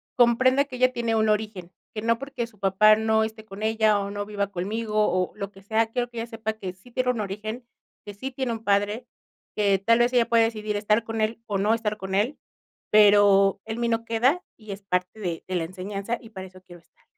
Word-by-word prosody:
comprenda 255 +3 +4
que 260 - -9
ella 255 0 +3
tiene 235 -2 -1
un 220 0 +2
origen, 210 -4 -2 0.2
que 215 - -4
no 230 0 +2
porque 275 -3 -4
su 215 -4 -23
papá 200 +2 +5
no 220 0 +2
esté 220 0 -5
con 205 0 -9
ella, 220 -1 +3
o 200 0 -4
no 205 0 -4
viva 205 -1 -2
conmigo, 210 +4 -3
o 185 0 0
lo 200 -2 -6
que 195 -1 -17
sea, 220 +2 +1
quiero 245 +1 -2
que 240 - -12
ella 230 - -4
sepa 225 -1 -4
que 190 -4 -7
sí 190 +6 -20
tiene 255 +1 0
un 240 - -4
origen, 215 +4 -5 0.4
que 205 - -8
sí 260 +7 -6
tiene 260 -1 -3
un 225 0 -7
padre, 205 +3 0 0.5
que 200 -2 +2
tal 230 +4 +3
vez 240 +1 +2
ella 240 -2 +3
pueda 230 -1 +5
decidir 215 -2 -2
estar 210 +2 +1
con 225 0 -5
él 220 +1 -1
o 205 - -1
no 205 +3 +2
estar 215 -2 -2
con 190 -2 -4
él, 225 +9 0 0.5
pero 205 -2 +5
en 220 +1 -5
mí 235 - +1
no 230 0 -1
queda, 245 +10 +2 0.2
y 215 -2 -10
es 195 +1 -7
parte 180 +1 -2
de 175 -5 -4
de 185 - -3
la 175 - 0
enseñanza 195 +5 -4
y 225 - -13
para 190 -4 -8
eso 185 0 -16
quiero 175 -1 -14
estar. - - -35
215 Hz, 240 wpm, -25 LUFS, 200-230 Hz, 0.5 s, papá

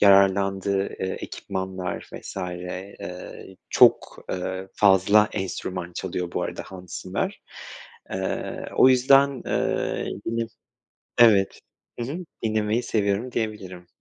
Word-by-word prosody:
yararlandığı, 100 0 +4
ııı, 95 -1 -3
ekipmanlar 95 -1 -5
vs. - - -8
ııı, 90 +1 -6 0.2
çok, - - +4
ııı, 95 +1 -3
fazla 100 +2 +5
enstrüman 90 -2 -4
çalıyor 90 -1 -3
bu - - -1
arada - - -4
Hans 90 -2 -8
Zimmer. 90 - -3 0.7
Iıı, 95 0 -3
o - - +8
yüzden, 135 +1 +5
ııı, - - 0 0.2
yine 115 0 -1 0.7
evet, 105 -5 +5 0.4
hı 120 - -1
hı, 150 +7 -4 0.3
dinlemeyi 110 +1 +1
seviyorum 105 +2 0
diyebilirim. 95 -6 -4
95 Hz, 105 wpm, -25 LUFS, 95-110 Hz, 0.7 s, o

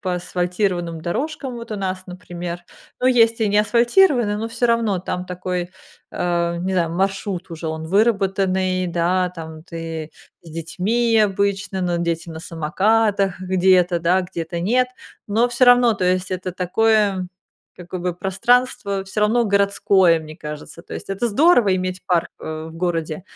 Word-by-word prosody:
по 185 -2 -2
асфальтированным 180 -1 -2
дорожкам. 270 - -3
Вот 230 -1 -9
у 210 - -3
нас, 185 -1 -3
например, 175 -1 -7 0.4
ну 255 - +2
есть 230 -2 +4
и 210 - +2
не 205 - +3
асфальтированные, 240 - +3
но 225 +1 -3
всё 235 +1 0
равно 230 -5 +1
там 180 0 -4
такой, 180 -1 -3 0.4
а, 170 -1 -1
не 185 +2 -2
знаю, 170 -3 +1
маршрут 190 0 -2
уже 165 0 -6
он 160 0 -5
выработанный, 190 -2 +1
да, 180 +2 +1
там 160 -2 -9
ты 165 -2 -6 0.3
с 165 - -13
детьми 205 +9 0
обычно, 200 -2 0
но 175 -1 0
дети 170 0 -2
на 160 0 -7
самокатах 195 +4 +1
где-то, 185 -1 +3
да, 180 +3 +2
где-то 170 -1 -5
нет. 250 +7 +2 0.4
Но 230 +4 +2
всё 240 +1 +3
равно, 245 -1 +6
то 190 -2 -2
есть 185 +1 0
это 185 0 -3
такое, 195 0 +1 0.5
как 180 -1 -12
бы, 180 -1 -1
пространство, 200 +1 0
всё 205 +2 -4
равно 230 +3 +3
городское, 200 -4 +3
мне 155 0 -10
кажется. 150 +1 -8
То - - -9
есть - - -7
это 200 +5 -1
здорово 230 - +4
иметь 185 0 -4
парк, 175 -3 +1
э, 155 0 -6
в - - -13
городе. 165 -2 -2
185 Hz, 160 wpm, -21 LUFS, 175-210 Hz, 0.5 s, равно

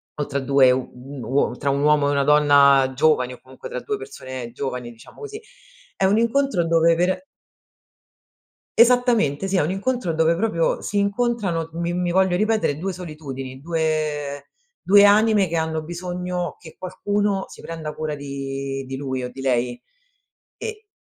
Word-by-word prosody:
o 150 - -2
tra 140 - -2
2 135 -1 +4
u 125 0 -1
uo 130 0 -2
tra 140 - -1
un 140 +1 0
uomo 150 -1 +3
e - - +1
una 140 -1 +2
donna 140 -2 +5
giovani 130 -3 +2
o 125 - -13
comunque 130 0 -11
tra - - -5
2 420 - -3
persone 130 - -8
giovani, 125 -2 -4
diciamo 115 -1 -16
così, 430 0 -8 0.6
è 195 - +2
un 195 +3 +3
incontro 235 -5 +1
dove 165 0 +4
per 180 +10 0 1.5
Esattamente, 235 - +4
sì, 195 - 0
è - - +3
un 150 - -1
incontro 195 -2 -1
dove 160 +1 +3
proprio 170 -3 0
si 205 - -4
incontrano, 200 -5 0
mi 170 +1 -2
mi 180 0 -1
voglio 190 0 +3
ripetere 215 -7 +1
2 190 +4 -3
solitudini, 140 -6 -7
due 155 -3 -2 0.4
due 200 +2 +7
anime 210 0 +5
che 170 -1 -3
hanno 160 -1 -1
bisogno 180 +1 -4
che 160 - -13
qualcuno 200 +1 -1
si - - -13
prenda 160 -2 -6
cura 155 -1 -3
di 135 -1 -5
di 135 +1 -5
lui 130 -2 -3
o - - -3
di 135 - -9
lei, 125 -2 0 0.7
e 435 -1 -7
160 Hz, 165 wpm, -22 LUFS, 140-195 Hz, 1.5 s, due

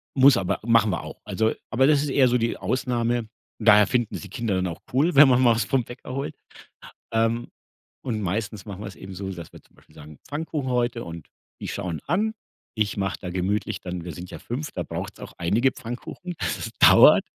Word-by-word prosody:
muss 135 +1 +7
aber 95 0 -1
machen 115 -2 +4
wir 85 - -2
auch. - - -9
Also 110 0 +1 0.2
aber 130 +4 +4
das 145 -1 +4
ist 145 - -2
eher 135 -1 +4
so 125 0 +3
die 115 -1 -1
Ausnahme. 120 -2 -1 0.3
Daher 105 -2 +6
finden 120 -4 0
es - - -5
die 100 - -9
Kinder 110 +1 -2
dann 95 0 0
auch 85 - -6
cool, 150 +6 +2
wenn 140 +1 +9
man 125 -1 +4
mal 120 -3 +5
was 115 -2 0
vom 130 +1 +1
Bäcker 120 +2 -9
holt. 135 +2 -4 0.8
Ähm. 115 +1 +1 0.5
Und 110 -5 -3
meistens 100 +1 -3
machen 100 -2 -8
wir - - -6
es 100 - -12
eben 95 - -9
so, 95 +1 -5
dass 85 -4 -8
wir - - -13
zum - - -29
Beispiel 75 - -23
sagen: 75 -1 -12
„Pfannkuchen 150 -3 -3
heute 120 -1 0
und 85 -2 -9 0.3
die - - -5
schauen 90 -6 -4
an.“ 205 +8 +1 0.4
Ich 110 -2 0
mache 95 -1 -2
da 90 - -6
gemütlich 95 +3 -1
dann 90 -2 -5
wir 85 - -5
sind 90 +3 -9
ja - - -8
5, 140 +6 -5
da - - -3
braucht - - -6
es - - -15
auch - - -12
einige 110 +10 +2
Pfannkuchen, 120 +9 -7
das 85 -7 -2
dauert, - - +8
115 Hz, 220 wpm, -24 LUFS, 95-130 Hz, 0.8 s, wenn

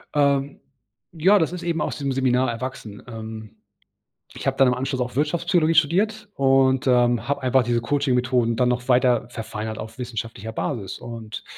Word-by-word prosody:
Ähm, 140 -1 +1 0.5
ja, 185 +6 +4
das 160 0 0
ist 180 -1 -6
eben 170 -2 -1
aus - - -2
dem 140 -2 -2
Seminar 130 -1 +1
erwachsen. 115 -3 -7
Ähm, 110 -2 -8 0.8
ich - - -8
habe 135 0 +1
dann 135 -2 +5
im 125 - +2
Anschluss 130 +1 -3
auch 125 0 -3
Wirtschaftspsychologie 165 +2 +1
studiert 205 +8 +2
und, 135 -1 +3
ähm, 120 -2 +2
habe 140 -1 -1
einfach 130 0 +3
diese 120 0 0
Coaching-Methoden 125 -3 +1
dann 125 -1 +2
noch 125 +1 -2
weiter 125 -2 +3
verfeinert 110 -1 -5
auf 110 +3 -8
wissenschaftlicher 115 -2 -5
Basis 110 -5 -4
und 115 -2 -8
130 Hz, 165 wpm, -23 LUFS, 115-140 Hz, 0.8 s, dann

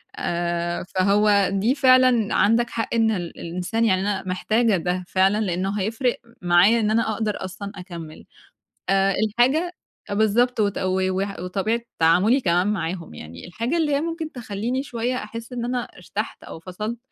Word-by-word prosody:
آآ، 175 0 -2
فهو 200 0 +3
دي 220 +8 +1
فعلًا 255 -5 +4
عندك 230 +3 +3
حق، 225 0 -3
إن 225 -1 +3
ال 175 -5 -4
الإنسان 180 +7 -2
يعني 190 -3 +2
أنا 200 -1 -1
محتاجة 215 +3 +1
ده 180 +2 -2
فعلًا، 195 +3 +2
لإنه 190 +3 -1
هيفرق 235 +5 0 0.2
معايا 180 +6 +5
إن 215 -1 +1
أنا 220 0 +1
أقدر 210 -3 -2
أصلًا 200 +2 -7
أكمل، 170 -4 -9 0.6
آآ، 195 0 +3
الحاجة 265 - +2 0.4
بالضبط، 220 +4 +2
وت 205 -1 +1
و 185 0 0
وح 195 +1 -3
وطبيعة 195 +6 -1 0.2
تعاملي 185 +11 +4
كمان 180 0 +2
معاهم. 175 - -3
يعني 80 - -10
الحاجة 235 - -2
اللي 300 -3 +1
هي 285 - +1
ممكن 330 -1 -4
تخلّيني 240 +2 -3
شوية 245 -1 -2
أحس 230 +1 -7
إن 240 -1 -3
أنا 245 0 -1
ارتحت 205 +4 -6
أو - - -9
فصلت، 210 +7 -5
205 Hz, 160 wpm, -23 LUFS, 185-235 Hz, 0.6 s, معايا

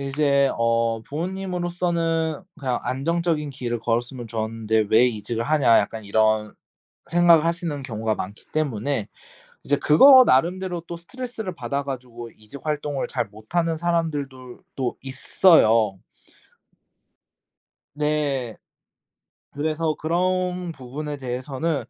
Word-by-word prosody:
이제 140 0 +2
어 115 -1 +1
부모님으로서는 175 -2 -2 0.2
'그냥 130 -4 -1
안정적인 160 +2 -1
길을 120 -3 -4
걸었으면 120 +1 -2
좋은데 110 -1 -1
왜 115 +3 +6
이직을 115 0 -2
하냐.' 135 -4 +4
약간 110 -1 -5
이런 110 +1 +1 0.5
생각을 170 -2 +5
하시는 170 -4 -2
경우가 110 -3 -2
많기 105 +3 -7
때문에 135 -5 -1 0.6
이제 145 - +2
그거 260 - +8
나름대로 175 - +1
또 170 - -5
스트레스를 225 +1 -6
받아 140 +1 -3
가지고 125 -3 -7
이직 110 +6 -12
활동을 150 -2 -2
잘 - - -1
못하는 160 +11 -2
사람들도 145 -7 -3 0.2
또 130 -3 -1
있어요. 120 - +3 2.0
네. 145 -5 -1 1.0
그래서 155 +2 -1
그런 180 +2 -1
부분에 145 +2 -6
대해서는 135 +4 -3
140 Hz, 270 characters per minute, -23 LUFS, 120-165 Hz, 2.0 s, 그거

